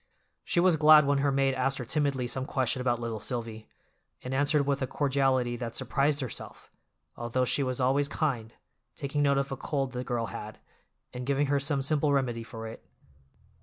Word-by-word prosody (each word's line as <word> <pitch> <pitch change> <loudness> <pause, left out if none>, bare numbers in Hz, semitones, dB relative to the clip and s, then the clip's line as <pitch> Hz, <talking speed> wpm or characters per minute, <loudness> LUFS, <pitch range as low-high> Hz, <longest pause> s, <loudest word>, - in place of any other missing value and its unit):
She 175 - 0
was 175 -2 +4
glad 155 -1 +7
when 140 0 +2
her 140 0 +2
maid 135 0 +2
asked 135 +1 0
her 125 - -5
timidly 140 -1 0
some 130 +2 -2
question 130 -3 0
about 120 -2 0
little 115 -2 -4
Silvy, 115 -2 -5 0.5
and 125 - -4
answered 145 +1 +2
with 140 0 0
a 130 - 0
cordiality 135 -3 +1
that 115 -1 -5
surprised 145 +1 +1
herself, 130 - -7 0.4
although 120 +2 -1
she 140 - +1
was 130 -1 -1
always 135 +3 +2
kind, 130 -8 -2 0.4
taking 140 +1 -2
note 140 -1 +3
of 140 0 -1
a 135 - -3
cold 135 -4 -2
the 125 0 -4
girl 120 -2 -2
had, - - -7 0.6
and 125 0 -6
giving 140 +1 +2
her 140 - +3
some 140 0 -1
simple 150 +1 +2
remedy 125 -4 0
for 115 -1 -8
it. 110 - -9
135 Hz, 190 wpm, -29 LUFS, 125-140 Hz, 0.6 s, glad